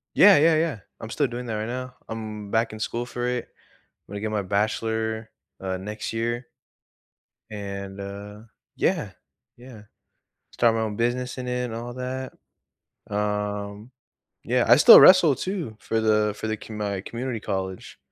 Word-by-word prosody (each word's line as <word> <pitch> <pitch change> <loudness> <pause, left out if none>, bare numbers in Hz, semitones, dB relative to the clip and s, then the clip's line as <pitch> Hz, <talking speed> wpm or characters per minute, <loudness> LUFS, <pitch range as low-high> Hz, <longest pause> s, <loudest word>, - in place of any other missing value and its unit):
Yeah, 200 -3 +8
yeah, 160 +2 +5
yeah. 155 -7 0 0.2
I'm 110 - -7
still 145 +3 0
doing 125 +1 -6
that 115 - -4
right 105 +1 -3
now. 130 +1 -5
I'm 110 -2 -6
back 115 0 +1
in 110 - -8
school 120 +2 -3
for 125 0 -4
it. 125 -1 -2 0.6
I'm - - -11
gonna 100 - -5
get 110 0 -2
my 105 - 0
bachelor, 110 +3 -1 0.3
uh, 95 -1 -3
next 105 +3 -6
year 120 +2 -2 1.0
and, 100 -1 -6
uh, 100 +1 -8 0.4
yeah, - - 0 0.5
yeah. 120 -4 -13 0.7
Start 115 -1 +3
my 115 - 0
own 105 -2 -3
business 125 +2 -1
in 125 -1 -5
it 125 0 -1
and 115 - -6
all 120 +1 -6
that. 130 +1 -5 0.8
Um 105 +1 -3 0.5
yeah, - - +2
I - - +7
still - - +10
wrestle, 175 -6 +8
too, 175 - -4
for 115 - -1
the 105 -1 +2
for 110 - -5
the 110 0 -1
commu 110 +1 -10
my 100 -2 -2
community 120 0 -4
college. 95 -2 -5
110 Hz, 165 wpm, -25 LUFS, 105-125 Hz, 1.0 s, still